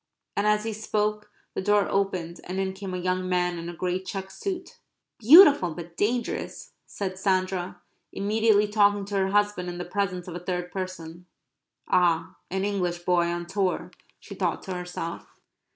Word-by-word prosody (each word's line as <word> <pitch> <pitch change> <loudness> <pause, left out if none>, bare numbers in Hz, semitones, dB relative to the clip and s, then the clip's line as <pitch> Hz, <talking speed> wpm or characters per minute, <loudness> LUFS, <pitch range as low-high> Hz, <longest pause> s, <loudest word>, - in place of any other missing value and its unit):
And 205 +1 +1
as 210 0 +3
he 225 0 -3
spoke 210 0 -1 0.2
the - - -2
door 205 +1 +3
opened 185 -4 -1
and 185 +2 -4
in 190 0 -1
came 190 -1 -6
a - - -2
young 185 0 -1
man 180 -1 0
in 170 +1 -6
a - - -6
grey 180 +2 -1
check 190 0 -6
suit. 370 - -5 0.4
"Beautiful 270 - +8
but 170 -1 -9
dangerous," 235 +5 -2 0.2
said 190 -2 -5
Sandra, 185 -2 0 0.3
immediately 210 +1 +2
talking 205 -1 +3
to 200 0 -5
her 190 0 +1
husband 205 -3 +1
in 175 - -6
the 175 - -4
presence 180 -1 -2
of 180 - -6
a 175 - -5
third 180 0 -3
person. 180 -2 -6 0.6
("Ah, 170 -2 +2
an 190 +1 -1
English 180 -4 -1
boy 175 -1 +2
on 175 0 -3
tour," 190 +1 -1 0.3
she - - -10
thought - - -1
to 190 - -5
herself.) 180 -2 -5
185 Hz, 170 wpm, -26 LUFS, 180-205 Hz, 0.6 s, Beautiful